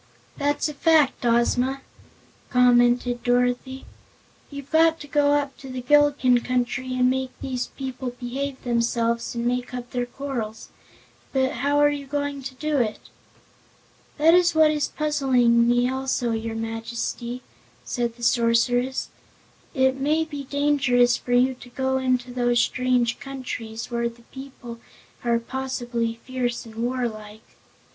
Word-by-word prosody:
"That's 290 +1 0
a 300 - -5
fact, 310 -3 +3
Ozma," 250 +3 +1 0.7
commented 245 -1 +3
Dorothy. 245 +2 0 0.6
"You've 280 -1 -9
got 325 0 +4
to 290 - -9
go 290 0 +3
up 285 -2 0
to 270 - -10
the 255 -1 -5
Gillikin 285 -2 +4
Country 255 +1 -1
and 250 0 +3
make 260 0 0
these 255 -2 -3
people 260 -1 -5
behave 260 +3 -5
themselves 235 -1 0
and 235 0 -2
make 250 +1 -1
up 245 -1 -7
their 245 -1 -2
quarrels. 245 -5 -5 0.6
But 265 0 +2
how 285 +4 0
are 290 0 +5
you 285 -1 -5
going 285 0 -3
to 260 0 -7
do 300 +1 -1
it?" 220 -3 -2 1.1
"That 320 +2 +5
is 350 -2 +4
what 315 -1 +6
is 300 -1 0
puzzling 255 -6 +2
me 245 0 +3
also, 260 -2 -1
your 225 0 -3
Majesty," 230 +2 -4 0.4
said 235 - -2
the 240 - -12
Sorceress. 245 +2 +2 0.7
"It 260 0 +3
may 305 +3 +2
be 290 -3 -7
dangerous 270 -4 +2
for 245 - -4
you 255 +2 +4
to 250 -1 -14
go 265 +1 -1
into 255 -1 0
those 240 -1 +2
strange 250 -1 +1
countries, 250 -4 -6
where 235 0 0
the 235 0 -18
people 260 -3 -9 0.4
are 235 -1 +2
possibly 240 -2 -3
fierce 250 -2 -2
and 225 - -12
warlike." 225 -3 -4
250 Hz, 140 wpm, -24 LUFS, 240-275 Hz, 1.1 s, what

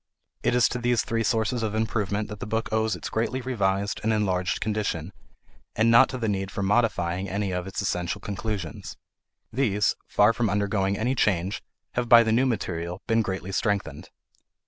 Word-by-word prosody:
It - - +1
is 125 - +5
to 125 - -3
these 120 -1 +1
three 115 0 -1
sources 115 +1 0
of 110 -1 -2
improvement 105 -1 -1
that 105 -1 -7
the - - -5
book 110 +1 -2
owes 110 -2 +1
its 90 - -6
greatly 115 +3 -1
revised 100 -5 -1
and 110 - +1
enlarged 95 -4 0
condition, 105 -5 -2 0.6
and 115 +2 +3
not 125 +3 +7
to 130 - -4
the 115 -3 -2
need 95 -2 -1
for 100 - -4
modifying 95 -4 +1
any 100 +1 -2
of 90 0 -3
its 95 +1 -4
essential 90 -2 -2
conclusions. 100 - -5 0.6
These, 105 -5 +1
far 105 +2 +4
from 115 -1 0
undergoing 100 -1 0
any 120 +4 0
change, 95 -6 0 0.3
have 120 -1 -2
by 120 -1 +9
the 110 - 0
new 125 +4 +3
material 90 -6 -3
been 115 0 +2
greatly 95 -2 -4
strengthened. 100 +1 -2
105 Hz, 180 wpm, -26 LUFS, 95-115 Hz, 0.6 s, by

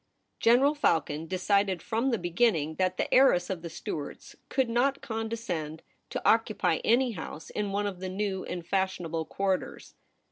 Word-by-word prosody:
General 255 +5 +5
Falcon 160 - 0
de 185 - -2
cided 200 -1 +2
from 230 +4 0
the 235 - +1
beginning 175 -4 +1
that 185 -1 +1
the - - -1
heiress 195 -10 +5
of 180 -3 -4
the 170 - -6
Stuarts 150 -2 -6
could 265 -2 +1
not 255 +4 +1
condescend 220 -9 -4 0.3
to - - -3
occupy - - +3
any 245 +2 +3
house 160 -5 -8
in 205 -1 -2
one 205 +1 0
of 195 -3 -4
the 185 0 -4
new 190 0 -2
and 175 -2 -5
fashionable 175 -3 -1
quarters. 195 +1 -2
190 Hz, 165 wpm, -29 LUFS, 175-230 Hz, 0.3 s, General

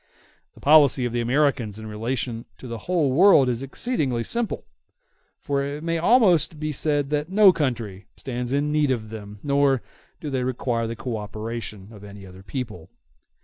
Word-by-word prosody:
The - - -16
policy 145 -4 +5
of 120 - -3
the 120 - 0
Americans 120 -4 +1
in 110 - -8
relation 115 +2 -3
to 130 - -10
the 115 -1 -5
whole 165 -7 +2
world 155 -2 +6
is 125 -1 -1
exceedingly 135 - -2
simple; 235 - -3 0.7
for 140 -1 -1
it 145 +2 -5
may 165 0 -1
almost 175 - +4
be 155 0 -2
said 145 0 0
that 150 +2 -1
no 195 -1 +6
country 115 - -3
stands 125 -1 -4
in 145 +2 0
need 150 -2 +2
of 110 -4 -2
them, 105 -2 -9
nor 140 -3 +2 0.4
do 150 - -5
they 130 -2 -1
require 120 -2 -1
the 115 - -4
co 120 0 -4
operation 105 -1 -6
of 105 -2 -13
any 100 -1 -11
other 95 0 -13
people. 105 - -6
130 Hz, 175 wpm, -24 LUFS, 115-150 Hz, 0.7 s, world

